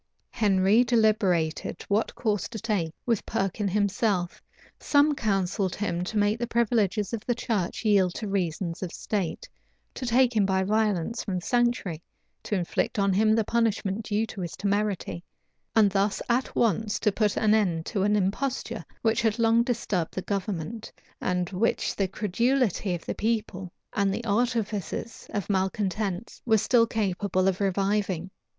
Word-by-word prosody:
{1498.} - - -14
Henry 200 +2 +4
deliberated 210 -10 +1
what 205 +3 0
course 210 -5 -1
to 230 - -6
take 205 -8 -1
with 230 -4 +1
Perkin 195 +2 -1
himself. 200 -2 0 0.4
Some 290 +1 +3
counselled 195 -6 0
him 180 -4 -2
to 215 - -3
make 205 +2 +2
the 240 - -2
privileges 225 -3 +1
of 225 -2 -3
the 245 - 0
church 225 -3 -2
yield 195 -4 +3
to 215 - -4
reasons 175 -3 -2
of 180 -3 -4
state, 205 - -3 0.5
to - - -7
take 245 0 +3
him 210 - +4
by 190 -1 +1
violence 215 0 0
from 195 - -3
the 180 - -4
sanctuary, 240 -9 0 0.4
to 210 - -2
inflict 180 +6 -1
on 200 -1 +2
him 215 +3 +4
the 225 - +2
punishment 220 -2 0
due 210 +2 0
to 205 - -8
his 170 -2 -4
temerity, 200 -3 -1 0.5
and 210 -3 +5
thus 200 +1 +1
at 245 +2 0
once 220 -1 +1
to 210 - +2
put 210 0 0
an 215 -1 +3
end 175 -7 +1
to 200 - -2
an 205 +2 +3
imposture 210 +7 -1 0.2
which 225 0 +2
had 220 -1 +1
long 230 0 +4
disturbed 225 -8 -1
the 185 - -3
government, 200 +1 -4 0.3
and 180 0 -1
which 200 +5 0
the 195 - 0
credulity 215 0 0
of 170 - -9
the - - -2
people 210 -5 -2 0.2
and 200 -2 +1
the 230 +4 -4
artifices 225 -1 -2
of 205 -4 -3
malcontents 195 +1 -2
were 220 -2 +4
still 230 +2 +3
capable 195 -3 0
of 195 +1 0
reviving. 195 -2 0
205 Hz, 160 wpm, -27 LUFS, 190-225 Hz, 0.5 s, and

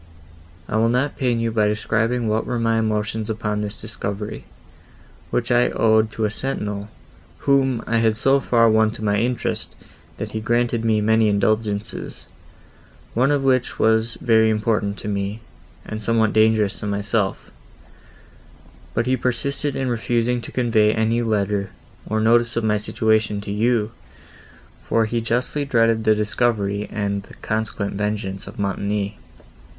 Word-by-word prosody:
I 110 - -1
will 115 +1 +3
not 125 +4 0
pain 125 -4 0
you 115 0 0
by 110 -2 +2
describing 110 +3 0
what 110 +1 0
were 125 - -1
my 115 -1 +1
emotions 110 0 -1
upon 105 -1 -2
this 105 0 -5
discovery, 105 -1 -5 0.8
which 120 0 -1
I 120 0 +4
owed 110 -1 +3
to 110 - -1
a 105 - -1
sentinel, 105 -5 -4 0.6
whom 135 -4 +2
I 115 - 0
had 110 -1 +2
so 135 +5 +3
far 115 -3 +3
won 110 0 +4
to 110 - -8
my 105 -1 +2
interest, 120 +2 -1 0.4
that - - -5
he 110 - -3
granted 120 0 0
me 110 -2 +2
many 110 +1 +3
indulgences, 105 0 -1 0.9
one 125 +4 +2
of 145 -2 +1
which 130 -2 +1
was 110 +1 +2
very 110 -2 +3
important 105 -2 0
to - - -6
me, 100 +2 -3 0.4
and 110 0 -5
somewhat 110 0 +2
dangerous 110 -2 +3
to 105 - -4
himself; 100 0 -1 1.4
but - - +1
he 130 +1 +2
persisted 135 +3 -1
in 135 - -1
refusing 120 0 0
to 115 - -9
convey 115 -4 +3
any 115 +1 +1
letter, 105 -3 0 0.4
or 110 - 0
notice 120 +2 +3
of 115 - 0
my 105 -1 +2
situation 110 0 +1
to 100 - -6
you, 110 +1 +1 0.9
for 115 -1 +1
he 115 +2 -1
justly 125 +5 -1
dreaded 115 -4 +2
a 110 - +6
discovery 105 -1 0
and 100 -1 -2
the 100 - -15
consequent 110 -2 -3
vengeance 100 -1 -3
of - - -10
Montoni. 100 +1 -2
110 Hz, 155 wpm, -22 LUFS, 105-115 Hz, 1.4 s, a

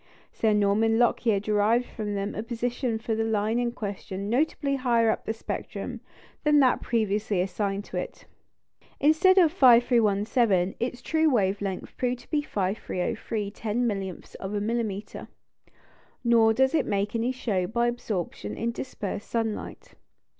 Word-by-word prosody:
Sir 220 - +1
Norman 210 +2 +3
Lockyer 235 -3 +2
derived 215 +4 +2
from 210 -3 -5
them 200 +1 -2
a - - -3
position 235 +1 -2
for 225 0 -3
the 220 0 0
line 220 +1 0
in 240 -1 0
question 200 -2 -5
notably 280 +1 +1
higher 235 -3 +3
up - - -5
in - - +1
the 225 - -7
spectrum - - -5 0.4
than 300 -1 +5
that 260 -3 +3
previously 210 -3 0
assigned 195 +2 -2
to - - -6
it. - - -6 0.7
Instead 315 +6 +4
of 340 -5 +6
5,317, 230 - +4
its 245 0 -3
true 320 -1 +2
wave 205 -6 +1
length 195 -2 -4
proved 250 -1 -1
to - - -22
be 300 -2 +2
5,303 205 -1 -3
ten 225 +3 -2
millionths 195 -5 -4
of 195 +2 -5
a - - 0
millimetre; 215 -2 -3 1.0
nor 230 -2 +5
does 265 +5 +2
it 325 - +1
make 200 0 -1
any 230 +2 0
show 205 -8 -1
by 235 +3 0
absorption 200 - -3
in 235 +1 -1
dispersed 210 -5 -6
sunlight. 225 -2 -4
225 Hz, 155 wpm, -26 LUFS, 205-245 Hz, 1.0 s, of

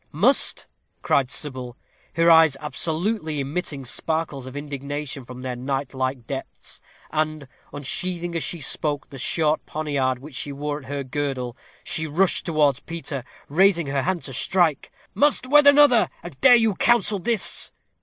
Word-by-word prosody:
"MUST!" - - +3 0.4
cried 135 -3 +2
Sybil, 130 -4 -4 0.4
her 165 +1 +5
eyes 160 -4 +6
absolutely 160 +2 -2
emitting 140 -1 -4
sparkles 145 0 -2
of 130 +2 -8
indignation 145 -1 -5
from 125 +1 -10
their 130 -1 -3
night 135 +2 -3
like 130 -2 -3
depths; 135 +2 -8 0.3
and, 155 -2 -2 0.2
unsheathing 170 +5 -2
as 165 - -1
she 170 - -3
spoke 145 +1 -2
the 135 - -9
short 155 +3 +1
poniard 140 -4 -1
which 145 +4 -12
she 140 +2 -3
wore 145 +1 -4
at 135 - -15
her 140 -1 -3
girdle, 130 -2 -3 0.3
she 160 0 -2
rushed 175 +5 +1
towards 150 -5 +2
Peter, 155 -6 -6 0.2
raising 170 +2 +3
her 140 0 -1
hand 175 +5 -1
to 135 - -6
strike. 165 +1 +1 0.2
"Must 265 +5 +2
wed 290 +2 +5
another! 285 -4 +6
And 165 -6 -10
dare 255 -2 +8
you 225 -3 +3
counsel 215 -1 +2
this?" 225 +2 +1
150 Hz, 155 wpm, -23 LUFS, 135-170 Hz, 0.4 s, dare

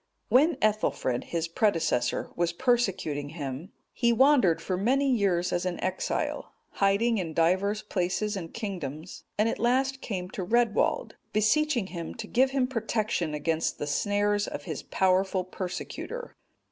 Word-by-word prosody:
When 305 +7 +5
Ethelfrid,(227) 210 - +1
his 170 -1 -2
predecessor, 165 - 0
was 170 0 0
persecuting 190 - 0
him, 140 +5 -5 0.2
he 235 -1 +2
wandered 250 - +4
for 185 - -2
many 260 +9 +2
years 195 -8 +1
as 175 - 0
an 180 -1 -2
exile, 185 0 -2 0.2
hiding 205 +3 +2
in 165 -4 -4
divers 190 +5 +2
places 205 +2 -1
and 170 -4 -6
kingdoms, 175 - -6
and 210 +2 +3
at - - -2
last 265 +3 +1
came 185 -4 -4
to 190 - -4
Redwald, 230 +2 +1 0.2
beseeching 240 +3 +2
him 170 -2 -5
to - - -6
give 260 +2 +3
him 265 -1 +1
protection 220 - -1
against 160 +2 -1
the - - -3
snares 205 +7 +1
of - - -5
his - - -5
powerful 190 0 +1
persecutor. 185 - -6
200 Hz, 145 wpm, -28 LUFS, 175-235 Hz, 0.2 s, When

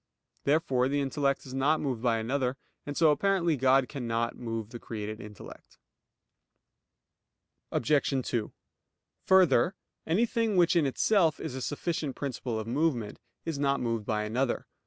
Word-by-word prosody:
Therefore 140 -4 +2
the 145 +1 0
intellect 140 0 0
is 130 - -9
not 140 +4 +2
moved 130 -6 -2
by 120 -2 +2
another; 125 +3 -1 0.3
and 145 - -4
so 160 -2 +5
apparently 175 +1 +2
God 135 0 +3
cannot 115 -4 -2
move 115 -2 -5
the 120 - -7
created 110 -1 -6
intellect. 105 -1 -12 1.9
Obj. 140 +4 +2 0.2
2: 115 -4 -2 0.8
Further, 185 -3 +5 0.3
anything 225 +3 +1
which 175 0 +4
in 160 -4 +3
itself 165 +3 +2
is - - -5
a 130 - -5
sufficient 145 0 -2
principle 125 -4 -3
of 110 - -4
movement, 120 -3 -1 0.3
is 160 -4 -3
not 140 -1 +1
moved 115 -3 -2
by 105 -1 0
another. 120 +4 -1
135 Hz, 140 wpm, -29 LUFS, 115-155 Hz, 1.9 s, so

